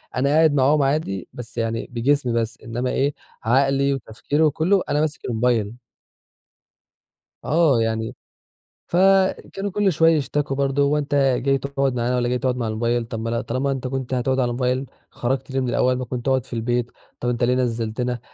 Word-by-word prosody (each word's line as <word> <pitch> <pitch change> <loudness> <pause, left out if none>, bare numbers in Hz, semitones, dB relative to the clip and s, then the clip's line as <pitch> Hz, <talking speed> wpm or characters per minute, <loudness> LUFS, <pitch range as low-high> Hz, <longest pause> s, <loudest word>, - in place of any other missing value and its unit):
أنا 135 +2 +1
قاعد 155 0 +4
معاهم 145 +2 +3
عادي 135 - -1
بس 120 0 -8
يعني 115 0 -2
بجسمي 125 +1 +1
بس 115 0 -1
إنّما 120 +2 -3
إيه، 140 +1 +1 0.3
عقلي 135 +3 +2
وتفكيري 135 +4 -2
وكلّه 160 +6 +2
أنا 145 - +2
ماسك 155 -1 -2
الموبايل. 115 -2 0 1.7
آه 150 -6 +3
يعني 110 0 -2 0.7
فكانوا 195 +2 +2
كُلّ 205 -1 +2
شوية 165 +2 +5
يشتكُوا 145 0 -1
برضو 140 0 +1
"هو 150 +1 +2
أنت 145 -1 -1
جاي 135 0 +2
تقعُد 140 -1 -1
معانا 120 +1 0
والّا 120 -1 +1
جاي 125 - +1
تقعُد 130 -2 0
مع 115 -3 -2
الموبايل، 115 +2 0
طب 115 -1 -6
ما 115 +1 -3
لأ 115 0 -1
طالما 135 +2 -1
أنت 130 -1 -3
كنت 130 0 -4
هتقعُد 130 +1 0
على 125 -2 +1
موبايل 125 +2 -1 0.2
خرجت 130 +3 -3
ليه 135 - 0
من 130 - -1
الأول 125 +1 +2
ما 130 - -4
كنت 125 +1 -5
اقعُد 130 -2 +2
في - - -11
البيت؟ 120 +1 -1 0.3
طب 120 - -1
أنت 120 0 -1
ليه 125 +1 +3
نزّلتنا؟" 120 0 -1
130 Hz, 180 wpm, -22 LUFS, 120-140 Hz, 1.7 s, شوية